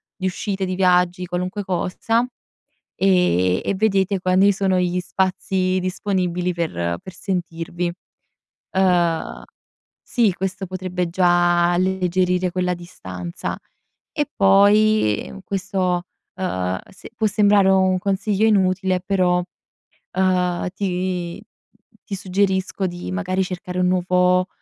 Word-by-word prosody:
di 190 Hz, -, -5 dB
uscite, 190 Hz, +1 st, -2 dB
di 185 Hz, -, -3 dB
viaggi, 180 Hz, -1 st, +2 dB
qualunque 180 Hz, +3 st, -3 dB
cosa, 190 Hz, +6 st, 0 dB, 0.7 s
e 180 Hz, -, +2 dB
e -, -, 0 dB
vedete 195 Hz, -2 st, +1 dB
quanti 185 Hz, +2 st, +4 dB
sono 190 Hz, -1 st, +1 dB
gli 180 Hz, 0 st, 0 dB
spazi 185 Hz, 0 st, 0 dB
disponibili 180 Hz, -1 st, -1 dB
per 85 Hz, -, -2 dB
per 185 Hz, -, -9 dB
sentirvi. 175 Hz, -2 st, -3 dB, 0.8 s
Uhm, 175 Hz, -3 st, +1 dB, 0.6 s
sì, 230 Hz, -6 st, +1 dB
questo 190 Hz, +2 st, -4 dB
potrebbe 185 Hz, -1 st, -3 dB
già 175 Hz, -1 st, +3 dB
alleggerire 180 Hz, 0 st, +1 dB
quella 180 Hz, 0 st, 0 dB
distanza. 95 Hz, -, -6 dB, 0.6 s
E 295 Hz, -, -1 dB
poi, 200 Hz, -, +4 dB
mhmm, -, -, -9 dB
questo, 190 Hz, -2 st, -1 dB, 0.3 s
uhm, 95 Hz, -, -2 dB
se -, -, -13 dB
può 220 Hz, -1 st, 0 dB
sembrare 205 Hz, -1 st, +4 dB
un 190 Hz, -1 st, +3 dB
consiglio 200 Hz, +2 st, 0 dB
inutile, 190 Hz, -3 st, +2 dB
però, 180 Hz, -1 st, +1 dB, 0.8 s
uhm, 180 Hz, -1 st, +1 dB
ti 180 Hz, -2 st, -2 dB, 0.6 s
ti 200 Hz, -, -4 dB
suggerisco 190 Hz, 0 st, -1 dB
di, 175 Hz, 0 st, -6 dB
magari, 185 Hz, 0 st, -1 dB
cercare 180 Hz, 0 st, -5 dB
un 180 Hz, -, +3 dB
nuovo 180 Hz, 0 st, +2 dB
185 Hz, 110 wpm, -21 LUFS, 180-190 Hz, 0.8 s, quanti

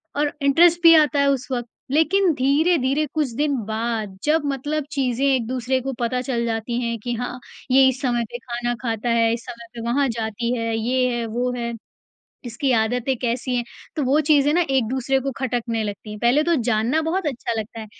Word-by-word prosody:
और 290 Hz, 0 st, 0 dB
इंटरेस्ट 330 Hz, +5 st, +4 dB
भी 330 Hz, 0 st, +9 dB
आता 300 Hz, -2 st, +4 dB
है 280 Hz, -, +3 dB
उस 265 Hz, -2 st, -1 dB
वक़्त, 240 Hz, -2 st, -2 dB, 0.2 s
लेकिन 335 Hz, +5 st, +3 dB
धीरे-धीरे 285 Hz, +1 st, +2 dB
कुछ 300 Hz, -5 st, 0 dB
दिन 290 Hz, +1 st, +1 dB
बाद 220 Hz, -2 st, -3 dB
जब 315 Hz, +2 st, +2 dB
मतलब 290 Hz, +2 st, -2 dB
चीज़ें 265 Hz, -2 st, 0 dB
एक 260 Hz, -4 st, +2 dB
दूसरे 255 Hz, +1 st, -1 dB
को 270 Hz, +1 st, -4 dB
पता 250 Hz, +1 st, 0 dB
चल 240 Hz, -3 st, -2 dB
जाती 230 Hz, +1 st, -2 dB
है 235 Hz, -1 st, -2 dB
कि 245 Hz, -, -2 dB
हाँ, 245 Hz, +1 st, -4 dB, 0.3 s
ये 265 Hz, 0 st, +6 dB
इस 260 Hz, 0 st, -1 dB
समय 240 Hz, -3 st, 0 dB
पे -, -, -4 dB
खाना 240 Hz, 0 st, -3 dB
खाता 230 Hz, -1 st, -2 dB
है, 230 Hz, -1 st, +3 dB
इस 230 Hz, 0 st, -5 dB
समय 235 Hz, 0 st, -9 dB
पे 235 Hz, -, -7 dB
वहाँ 280 Hz, +2 st, +2 dB
जाती 230 Hz, +1 st, -2 dB
है, 230 Hz, -1 st, -1 dB
ये 250 Hz, +3 st, +1 dB
है 235 Hz, -1 st, -2 dB
वो 240 Hz, +3 st, -1 dB
है, 235 Hz, -1 st, -3 dB, 0.7 s
इसकी 240 Hz, +3 st, -2 dB
आदतें 245 Hz, +3 st, +1 dB
कैसी 245 Hz, +1 st, -1 dB
हैं 240 Hz, -, -1 dB, 0.3 s
तो 305 Hz, -, 0 dB
वो 275 Hz, +4 st, +3 dB
चीज़ें 290 Hz, -1 st, +4 dB
ना 350 Hz, -, +3 dB
एक-दूसरे 265 Hz, +1 st, +1 dB
को 275 Hz, +1 st, -2 dB
खटकने 240 Hz, -3 st, -2 dB
लगती 205 Hz, 0 st, -6 dB
हैं। 210 Hz, -, -7 dB
पहले 245 Hz, +7 st, +3 dB
तो 340 Hz, +1 st, +2 dB
जानना 235 Hz, +6 st, +2 dB
बहुत 365 Hz, +1 st, -1 dB
अच्छा 255 Hz, -4 st, -2 dB
लगता 220 Hz, +1 st, -6 dB
है, 220 Hz, -, -7 dB
250 Hz, 205 wpm, -22 LUFS, 235-280 Hz, 0.7 s, भी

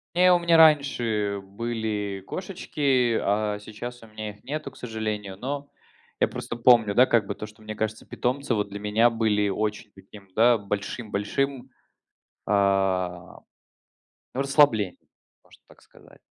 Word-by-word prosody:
Нет, 180 Hz, +1 st, +6 dB
у 175 Hz, -, +4 dB
меня 170 Hz, -1 st, +4 dB
раньше 120 Hz, -10 st, +3 dB
были 105 Hz, -1 st, -4 dB
кошечки, 140 Hz, -, 0 dB
а 105 Hz, 0 st, 0 dB
сейчас 120 Hz, +3 st, -8 dB
у 115 Hz, -, -13 dB
меня 110 Hz, -1 st, -6 dB
их 105 Hz, -, -20 dB
нету, 150 Hz, +4 st, -4 dB
к -, -, -22 dB
сожалению, 105 Hz, -4 st, -4 dB
но 140 Hz, +4 st, -5 dB, 0.5 s
я -, -, +4 dB
просто 120 Hz, -, -6 dB
помню, 115 Hz, -4 st, +5 dB
да, 125 Hz, +4 st, +6 dB
как 115 Hz, -5 st, +2 dB
бы 100 Hz, -, -2 dB
то, 105 Hz, -, -7 dB
что, 110 Hz, +1 st, -16 dB
мне 110 Hz, 0 st, -7 dB
кажется, 110 Hz, 0 st, -3 dB
питомцы, 130 Hz, +1 st, -2 dB
вот 105 Hz, -2 st, 0 dB
для 100 Hz, +1 st, -7 dB
меня, 110 Hz, +3 st, +3 dB
были 110 Hz, -3 st, +1 dB
очень 105 Hz, +2 st, -2 dB
таким, 100 Hz, +1 st, -15 dB
да, 120 Hz, +1 st, +5 dB
большим-большим, 110 Hz, +6 st, -3 dB, 0.8 s
а, 95 Hz, -3 st, 0 dB, 0.9 s
ну, 130 Hz, -, -1 dB
расслаблением, 135 Hz, -, +3 dB, 0.5 s
можно -, -, -21 dB
так -, -, -20 dB
сказать. -, -, -20 dB
110 Hz, 145 wpm, -25 LUFS, 105-125 Hz, 0.9 s, Нет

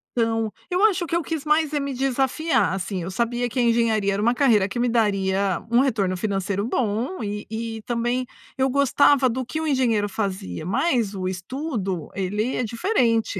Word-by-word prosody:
Então, 225 Hz, -2 st, 0 dB, 0.2 s
eu 365 Hz, +3 st, +2 dB
acho 380 Hz, -4 st, +2 dB
que 335 Hz, -, -2 dB
eu 340 Hz, -, +2 dB
quis 315 Hz, -2 st, -4 dB
mais 305 Hz, 0 st, +2 dB
é 295 Hz, -, +1 dB
me 280 Hz, -1 st, -3 dB
desafiar, 265 Hz, -, +1 dB
assim, 190 Hz, 0 st, -3 dB
eu 185 Hz, -, -5 dB
sabia 240 Hz, +3 st, -1 dB
que 255 Hz, -, -3 dB
a -, -, +4 dB
engenharia 230 Hz, -4 st, +2 dB
era 200 Hz, -, -1 dB
uma 235 Hz, +2 st, +3 dB
carreira 230 Hz, -7 st, +3 dB
que 240 Hz, -, -5 dB
me 245 Hz, 0 st, +2 dB
daria 195 Hz, -4 st, +1 dB
um 235 Hz, -, +5 dB
retorno 215 Hz, -9 st, +1 dB
financeiro 200 Hz, 0 st, -1 dB
bom 235 Hz, -, -1 dB
e 210 Hz, 0 st, -4 dB
e 225 Hz, 0 st, -4 dB
também, 240 Hz, +2 st, -1 dB, 0.3 s
eu 265 Hz, 0 st, +2 dB
gostava 280 Hz, 0 st, +4 dB
do 255 Hz, +1 st, -3 dB
que 315 Hz, +6 st, -4 dB
o 320 Hz, -, -2 dB
engenheiro 230 Hz, -7 st, +1 dB
fazia, 190 Hz, -, -4 dB
mas 235 Hz, -, +1 dB
o 185 Hz, -1 st, -3 dB
estudo, 190 Hz, -, -4 dB
ele 210 Hz, +5 st, -1 dB
é 250 Hz, -, 0 dB
diferente. 230 Hz, -, 0 dB
230 Hz, 190 wpm, -23 LUFS, 200-265 Hz, 0.3 s, um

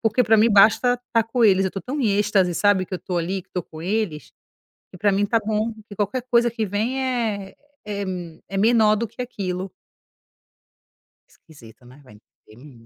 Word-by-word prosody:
porque 225 Hz, +2 st, +2 dB
pra 225 Hz, -1 st, +4 dB
mim 220 Hz, +2 st, +5 dB
basta 220 Hz, +4 st, +5 dB, 0.2 s
tá 230 Hz, -1 st, +4 dB
com 235 Hz, +1 st, 0 dB
eles. 195 Hz, -2 st, +4 dB
Eu 190 Hz, -, -1 dB
tô 195 Hz, -, -5 dB
tão 280 Hz, +3 st, -4 dB
em 225 Hz, -6 st, +2 dB
êxtase, 195 Hz, -4 st, +2 dB
sabe, 200 Hz, -2 st, +2 dB
que 190 Hz, -, -6 dB
eu 180 Hz, -, -3 dB
tô 180 Hz, -, -4 dB
ali, 180 Hz, +3 st, -2 dB
que -, -, -40 dB
tô 180 Hz, -, -2 dB
com 160 Hz, -1 st, -11 dB
eles, 190 Hz, -5 st, -2 dB, 0.6 s
que 185 Hz, -, -12 dB
pra 205 Hz, +2 st, +2 dB
mim 200 Hz, +1 st, +1 dB
tá 225 Hz, +2 st, +1 dB
bom, 215 Hz, +1 st, -1 dB, 0.2 s
que 205 Hz, -, -11 dB
qualquer 210 Hz, +5 st, -2 dB
coisa 240 Hz, 0 st, +4 dB
que 225 Hz, -1 st, -3 dB
vem 220 Hz, +7 st, -2 dB
é 220 Hz, -6 st, -2 dB, 0.3 s
é 200 Hz, -1 st, -3 dB
m 180 Hz, -4 st, -6 dB
é 195 Hz, -, -4 dB
menor 215 Hz, 0 st, +4 dB
do 230 Hz, +2 st, -2 dB
que 230 Hz, +3 st, -8 dB
aquilo. 190 Hz, -6 st, -4 dB, 1.6 s
Esquisita, 120 Hz, -6 st, -18 dB
né, 130 Hz, +4 st, -16 dB
vai 115 Hz, -, -17 dB
entender 115 Hz, +3 st, -18 dB
205 Hz, 200 wpm, -22 LUFS, 180-225 Hz, 1.6 s, mim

